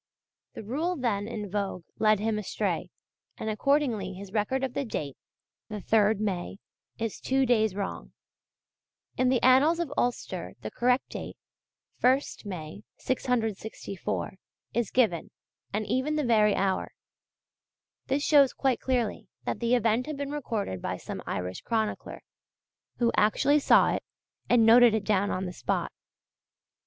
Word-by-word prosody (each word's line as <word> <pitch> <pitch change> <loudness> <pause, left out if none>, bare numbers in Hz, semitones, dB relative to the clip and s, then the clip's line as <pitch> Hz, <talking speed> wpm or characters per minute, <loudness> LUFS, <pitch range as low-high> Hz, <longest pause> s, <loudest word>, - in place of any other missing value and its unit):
The - - -7
rule 310 - -1
then 215 - -1
in 215 -2 -5
vogue 195 -2 -3 0.2
led 215 -2 +4
him 215 0 0
astray, 210 - -2 0.5
and 220 - -3
accordingly 230 -5 +1
his 195 +1 -10
record 230 +5 0
of 260 -2 -2
the - - -1
date 145 - -4 0.5
the 215 - -4
3rd 215 +1 +3
May 195 -3 -3 0.4
is 225 -2 -3
two 265 0 +1
days 220 -5 +2
wrong. 200 -1 -5 1.0
In 255 0 +2
the 255 -1 +3
Annals 275 +7 +5
of 320 -5 -2
Ulster 245 0 -2
the - - -5
correct 250 +2 +1
date - - -7 0.6
1st 260 -1 +2
May, 175 0 -7 0.2
664 220 -7 -2 0.4
is 235 -1 0
given, 215 -10 +1 0.4
and 210 +1 -2
even 260 +7 0
the 305 - 0
very 215 -3 +4
hour. 190 -1 -1 1.1
This 280 +2 0
shows 285 -3 +5
quite 265 -3 +1
clearly 245 -5 -1 0.2
that - - -2
the 235 +1 +2
event 235 +1 +1
had 305 -2 -4
been 280 0 -4
recorded 220 - -3
by - - -3
some - - -7
Irish 90 +1 -3
chronicler, 220 -2 -2 0.7
who 235 -1 +2
actually 280 +8 +3
saw - - +5
it - - -3 0.5
and 235 -2 +5
noted 235 0 +7
it 215 - -1
down 205 -1 +2
on 185 +1 -2
the 180 - -5
spot. - - -2
225 Hz, 145 wpm, -28 LUFS, 205-255 Hz, 1.1 s, noted